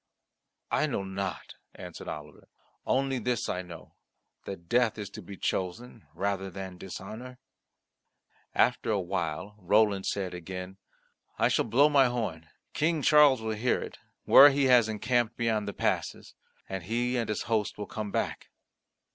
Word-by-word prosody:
"I - - +2
know 100 - -2
not," 95 -1 -5 0.2
answered - - -9
Oliver. 75 -1 -8 0.4
"Only 135 0 +1
this 120 0 -1
I 90 - -2
know 85 -3 -12 0.5
that 85 -4 -8
death 120 +2 +2
is 105 -2 -6
to - - -8
be 100 -1 -10
chosen 105 +1 -4
rather 95 +1 -2
than 95 -1 -8
dishonour." 110 +7 -8 1.2
After - - +2
a 105 -2 +2
while 90 0 -3
Roland 100 +1 +2
said 95 -3 -2
again, 90 +2 -7 0.6
"I - - +3
shall - - +2
blow 125 +6 +5
my 140 -3 +5
horn; 95 -11 -4 0.2
King 160 -1 0
Charles 145 -6 +6
will 110 0 -1
hear 115 +4 +1
it, - - -8 0.2
where 145 +2 +9
he 140 0 +1
has 125 -4 +5
encamped 120 +2 0
beyond 110 -3 0
the - - -2
passes, - - -2 0.3
and 95 -2 -5
he 120 +4 -1
and 115 -3 -1
his 105 - -2
host 110 -3 -1
will 105 - -4
come 105 0 -5
back." - - -3
105 Hz, 155 wpm, -29 LUFS, 95-120 Hz, 1.2 s, where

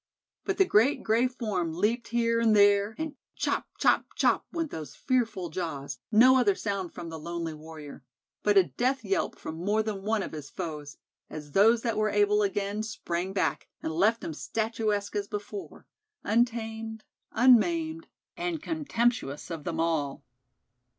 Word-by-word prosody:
But 395 - -1
the 385 - +5
great 260 - +3
gray 230 +3 +3
form 210 -10 -2
leaped 225 +6 0
here 230 0 +1
and 225 -2 +4
there, 205 +1 +4
and 315 -2 -4 0.2
chop, - - -1
chop, - - +3
chop - - +2
went 330 -3 -3
those 150 -3 -7
fearful 230 -9 0
jaws, 140 -7 -4
no 255 +5 +7
other 380 +10 +3
sound 200 - -3
from 170 - -7
the 160 -1 -7
lonely 170 0 -4
warrior; 155 -3 -10 0.4
but 205 -1 +3
a 195 - +8
death 255 +8 -1
yelp 385 -5 -1
from 160 +2 -7
more 210 +3 +2
than 210 -3 -4
one 215 0 0
of - - -6
his 150 -3 -7
foes, 150 -5 -6 0.3
as 150 -1 -8
those 225 +7 +5
that 230 -3 -1
were 215 0 +2
able 205 0 +3
again 205 +1 -1
sprang 190 -4 -3
back, 195 - -1 0.2
and 160 - -2
left 210 +8 +2
him 165 - -4
statuesque 215 +2 -2
as 205 -1 -1
before, 205 -1 -7 0.4
untamed, 225 -1 -1 0.3
unmaimed, 320 +7 +3 0.3
and 340 -3 -3
contemptuous 240 - -1
of 160 -3 -6
them 165 -2 -3
all. 160 -4 -1
210 Hz, 160 wpm, -28 LUFS, 170-235 Hz, 0.4 s, a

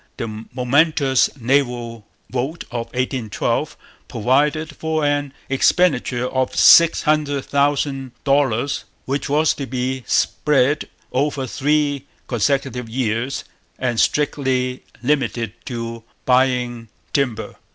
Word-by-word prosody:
The 110 -1 -5
momentous 135 +2 +2
naval 120 -4 0 0.2
vote 135 +7 -3
of 120 -1 -3
1812 125 -2 -2 0.3
provided 150 +7 +1
for 160 0 -1
an 145 -1 0 0.2
expenditure 135 -3 +2
of 130 0 -1
six 170 0 +7
hundred 150 -3 +1
thousand 140 -2 0
dollars, 140 -1 +1 0.2
which 140 +2 -2
was 150 +2 +3
to 140 - -6
be 130 +1 -2
spread 145 0 +2 0.2
over 140 0 0
three 145 0 0 0.2
consecutive 125 0 -1
years 120 +2 -1 0.3
and 120 -3 -1
strictly 130 -3 +1 0.2
limited 120 -5 0
to 115 -2 -5 0.2
buying 125 -3 +1 0.2
timber. 125 -6 -1
130 Hz, 100 wpm, -20 LUFS, 120-145 Hz, 0.3 s, six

